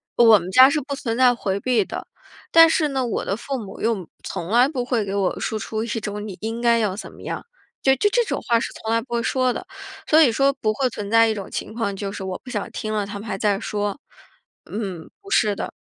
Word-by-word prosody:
我 225 -3 +7
们 175 +1 -7
家 255 +7 +8
是 300 +2 0
不 280 +1 -5
存 235 -5 -3
在 250 0 +5
回 195 -3 -2
避 225 -3 +1
的， - - -7 0.4
但 330 0 +9
是 320 -1 +2
呢， 265 -2 -1
我 235 - -2
的 200 - -2
父 270 +2 -4
母 200 -4 -9
又 215 -7 -1 0.2
从 170 - -5
来 245 +3 +5
不 270 -4 -3
会 245 -4 0
给 195 - -4
我 195 -2 0
输 220 - -2
出 220 +1 -3
一 230 - -5
种 210 -1 -4
你 195 - -7
应 225 +1 -3
该 235 -1 +3
要 205 -4 0
怎 - - -8
么 - - -15
样。 - - -5 0.4
就 265 0 +5
这 415 - +3
这 480 +2 +2
种 - - -3
话， 235 -1 +2
是 - - -4
从 220 - -3
来 230 - +3
不 240 +1 -8
会 235 - +1
说 255 +1 +1
的。 - - -7 0.4
所 310 - +5
以 295 -7 +6
说 275 +4 +3
不 220 -5 -1
会 260 +2 0
存 210 -3 -6
在 230 0 +6
一 220 - 0
种 195 -2 -7
情 - - -5
况， 215 -4 -2
就 195 0 -4
是 195 - -6
我 185 -1 -4
不 255 - -10
想 210 -5 -3
听 215 - -4
了， 210 -2 -1
他 200 0 -7
们 215 - -9
还 195 -2 -3
在 200 -1 +1
说。 205 +2 -3 0.7
嗯， 195 -6 -5
不 395 - -13
是 215 - +3
的。 - - -4
225 Hz, 280 characters per minute, -22 LUFS, 205-255 Hz, 0.7 s, 但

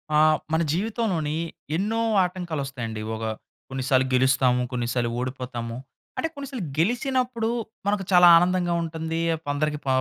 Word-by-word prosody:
ఆహ్, 155 0 +5 0.2
మన 160 - +3
జీవితంలోని 185 -6 -1 0.4
ఎన్నో 220 +5 0 0.2
ఆటంకాలు 180 -5 -3
వస్తాయండి. 115 -5 -5
ఒక 110 - -6 0.5
కొన్నిసార్లు 130 0 +1
గెలుస్తాము, 130 -1 +3
కొన్నిసార్లు 120 -1 -1
ఓడిపోతాము. 125 -2 -4 0.4
అంటే - - 0
కొన్నిసార్లు 275 - -6
గెలిచినప్పుడు 245 +4 0 0.4
మనకు 205 -1 +1
చాలా 180 -1 +8
ఆనందంగా 175 0 +2
ఉంటుంది. 160 0 -3 0.3
కొందరికి 150 +1 -1
ప - - -9
160 Hz, 120 wpm, -25 LUFS, 130-195 Hz, 0.5 s, చాలా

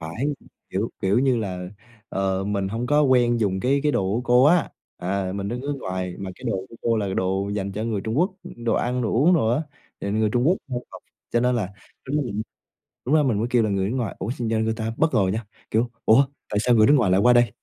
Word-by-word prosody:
phải, 80 +11 -4 0.5
kiểu, - - -1
kiểu 100 +4 +3
như 130 -1 +3
là, 90 -5 -4 0.4
ờ, 95 0 -1
mình 100 -1 -1
hông 115 +4 -3
có 150 +3 +3
quen 120 -4 +3
dùng 95 -3 0
cái 135 +5 +2
cái 150 -1 +2
đồ - - +2
của 115 - 0
cô 125 +1 +5
á. 170 +4 +4 0.3
À, 95 +1 -2
mình 100 0 -3
đang 120 +3 -3
nước 145 +2 -3
ngoài 95 -1 -3
mà 95 -1 -5
cái - - -15
đồ 115 -5 0
của - - -14
cô 115 -1 +2
là 100 -3 -1
đồ 95 +1 0
dành 100 -1 -3
cho 105 +3 -3
người 110 -3 -1
Trung 110 +7 -2
Quốc, 180 +3 +3 0.3
đồ 115 - +2
ăn 125 +1 0
đồ 115 - -1
uống 155 +10 +4
đồ 115 -9 +2
á, 125 +7 +1 0.4
thì 100 - -3
người 110 +1 +1
Trung 120 +2 +1
Quốc 185 - +3
h - - -10 0.2
học - - -11 0.3
cho 120 - +2
nên 125 +1 +2
là 105 -6 -1 0.4
tính 140 +3 -2
là 150 - +1
mình 110 -5 -3 0.6
lúc 135 - +1
đó 155 - +5
mình 125 -7 +1
mới 115 - 0
kêu 120 -2 +3
là 110 - 0
người 100 +1 0
nước 130 - -2
ngoài, 120 -5 -2
ủa, 100 - -3
xong 120 -2 -3
ra 110 0 +1
người 110 0 +1
ta 110 0 -3
bất 160 0 +1
ngờ - - +4
nha, 110 +2 -3 0.3
kiểu, 115 +2 +1
"Ủa, 125 +6 +6 0.3
tại 105 - 0
sao 120 +2 +3
người 110 -2 +6
nước 145 - +6
ngoài 110 -7 +2
lại 95 +1 +4
qua 125 +4 +6
đây?" 120 -3 +4
115 Hz, 270 wpm, -24 LUFS, 100-125 Hz, 0.6 s, Ủa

